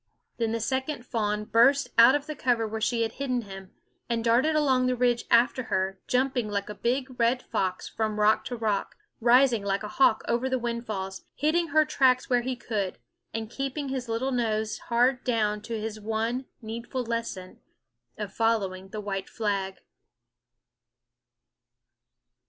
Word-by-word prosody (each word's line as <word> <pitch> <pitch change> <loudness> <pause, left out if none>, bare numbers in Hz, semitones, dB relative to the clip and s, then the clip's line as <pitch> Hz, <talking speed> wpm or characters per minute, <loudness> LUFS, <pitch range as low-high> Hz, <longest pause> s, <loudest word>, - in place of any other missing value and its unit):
Then 230 -2 0
the 230 - -1
second 260 +2 -2
fawn 210 -3 -1
burst 255 +5 +4
out 235 +4 +8
of 290 -1 -2
the 305 -1 -5
cover 240 -4 +1
where 220 +1 -5
she 230 +1 +1
had 225 - -2
hidden 255 -2 -2
him, 195 -2 -10 0.4
and 230 -1 0
darted 245 +7 +3
along 260 -4 +3
the 255 - +1
ridge 245 -1 +1
after 240 +1 +3
her, 190 -2 -1
jumping 250 -3 +1
like 200 0 -2
a - - -4
big 255 +4 -2
red 235 +2 +2
fox 185 -1 -2
from 215 -1 -2
rock 210 +1 +4
to 245 - -4
rock, 215 -4 -1 0.2
rising 240 -1 +4
like 200 +1 -1
a - - -3
hawk 220 -1 +3
over 240 +3 0
the 260 - +1
windfalls, 220 -5 -4
hitting 335 +3 +1
her 310 0 +4
tracks 255 -2 +2
wherever 245 0 +2
he 255 - -1
could, 210 - -3 0.3
and 220 0 -5
keeping 275 +1 -3
his 255 -3 -4
little 240 +4 -1
nose 220 -3 -1
hard 245 +2 +2
down 215 -4 0
to 225 +1 -4
his 215 0 -5
one 225 +4 -2 0.2
needful 235 +3 -4
lesson 230 -6 -4 0.6
of 210 -2 -5
following 195 -5 0
the 210 +2 -5
white 195 -2 -4
flag. 195 -3 -2
230 Hz, 165 wpm, -27 LUFS, 215-255 Hz, 0.6 s, out